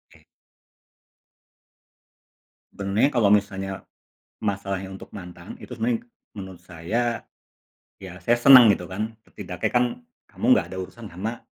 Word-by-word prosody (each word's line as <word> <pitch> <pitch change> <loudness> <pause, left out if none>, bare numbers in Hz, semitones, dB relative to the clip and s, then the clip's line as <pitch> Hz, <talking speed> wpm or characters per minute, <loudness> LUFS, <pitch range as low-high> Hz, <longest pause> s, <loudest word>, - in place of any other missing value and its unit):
Oke. - - -22 2.5
Sebenernya 100 +7 +1
kalau 115 -7 +3
misalnya 95 -2 -1 0.6
masalahnya 95 -2 -2
untuk 95 - -10
mantan, 90 -1 -9
itu - - -13
sebenarnya 235 0 -1 0.3
menurut 95 -3 -8
saya, 105 +8 -2 0.8
ya 90 -2 -10
saya 120 +1 +3
senang 125 -2 +9
gitu 90 -3 0
kan, 110 +4 -5
setidak - - -5
kan 125 - 0 0.2
kamu - - -8
nggak - - +1
ada 95 - -6
urusan 105 +3 -8
sama, 110 +7 -5
100 Hz, 120 wpm, -24 LUFS, 95-120 Hz, 2.5 s, senang